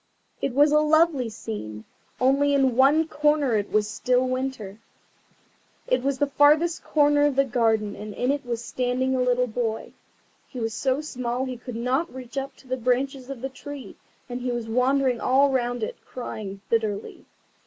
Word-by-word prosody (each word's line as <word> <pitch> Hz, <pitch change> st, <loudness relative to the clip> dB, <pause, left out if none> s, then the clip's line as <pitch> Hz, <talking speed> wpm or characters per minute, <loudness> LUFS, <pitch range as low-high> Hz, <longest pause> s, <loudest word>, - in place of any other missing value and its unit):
It 255 Hz, -, -2 dB
was 290 Hz, +1 st, +5 dB
a 300 Hz, -, +5 dB
lovely 305 Hz, -4 st, +3 dB
scene, 110 Hz, -, -7 dB, 0.3 s
only 280 Hz, +2 st, +3 dB
in 265 Hz, -3 st, +2 dB
one 290 Hz, +5 st, +4 dB
corner 295 Hz, -5 st, +2 dB
it 205 Hz, -1 st, -1 dB
was 210 Hz, 0 st, +2 dB
still 250 Hz, +4 st, +1 dB
winter. 255 Hz, -6 st, -4 dB, 1.1 s
It -, -, +1 dB
was 275 Hz, 0 st, -1 dB
the 285 Hz, -, +2 dB
farthest 300 Hz, +4 st, +3 dB
corner 290 Hz, -1 st, +3 dB
of 285 Hz, -, -1 dB
the 275 Hz, 0 st, +3 dB
garden, 225 Hz, -4 st, +1 dB
and 210 Hz, 0 st, -7 dB
in 250 Hz, +2 st, +1 dB
it 285 Hz, 0 st, -2 dB
was 235 Hz, -1 st, -4 dB
standing 255 Hz, +1 st, -1 dB
a 255 Hz, -, +1 dB
little 250 Hz, 0 st, +2 dB
boy. 225 Hz, -1 st, -3 dB, 0.5 s
He 255 Hz, -, -8 dB
was 225 Hz, -1 st, -2 dB
so 260 Hz, +4 st, 0 dB
small 255 Hz, -3 st, -3 dB
that 260 Hz, -, -4 dB
he 250 Hz, -, -6 dB
could 245 Hz, 0 st, -8 dB
not 255 Hz, +8 st, -1 dB
reach 255 Hz, -1 st, -10 dB
up 275 Hz, 0 st, -4 dB
to 265 Hz, -, -20 dB
the 255 Hz, 0 st, -2 dB
branches 255 Hz, +2 st, -1 dB
of 270 Hz, -4 st, -7 dB
the 270 Hz, -, -3 dB
tree, 285 Hz, +1 st, -9 dB, 0.3 s
and 245 Hz, 0 st, -5 dB
he 250 Hz, 0 st, -2 dB
was 240 Hz, -2 st, -3 dB
wandering 255 Hz, +1 st, +1 dB
all 275 Hz, +2 st, +4 dB
round 245 Hz, -2 st, -1 dB
it, -, -, -4 dB
crying 205 Hz, -5 st, -7 dB
bitterly. 215 Hz, -3 st, -2 dB
255 Hz, 185 wpm, -25 LUFS, 235-275 Hz, 1.1 s, was